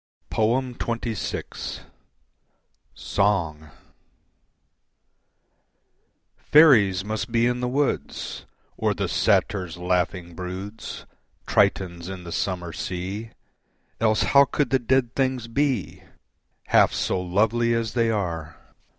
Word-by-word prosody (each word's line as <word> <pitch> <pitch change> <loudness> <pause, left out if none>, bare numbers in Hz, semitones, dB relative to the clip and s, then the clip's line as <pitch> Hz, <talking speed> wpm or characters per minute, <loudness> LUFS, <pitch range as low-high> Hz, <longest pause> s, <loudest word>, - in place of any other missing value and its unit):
XXVI. 115 -1 -2 1.1
Song 80 -7 0 2.7
Faeries 105 - +5
must 110 +2 -3
be 115 0 +3
in 125 0 +1
the 125 - -1
woods 140 +3 -2 0.3
Or - - 0
the - - -1
satyrs' 90 -4 +1
laughing 90 0 -1
broods 95 +5 -7 0.4
Tritons 85 -2 +1
in 95 -2 -7
the 85 - -8
summer 90 -2 -2
sea, 95 +7 -4 0.7
Else 110 -1 +2
how 140 0 +6
could 140 -2 -1
the 135 - +3
dead 125 0 +1
things 130 -3 0
be 125 - -1 0.7
Half - - +5
so 90 - 0
lovely 110 +6 +1
as 115 -2 -2
they 115 0 +2
are? 85 -7 -3
105 Hz, 100 wpm, -24 LUFS, 90-120 Hz, 2.7 s, how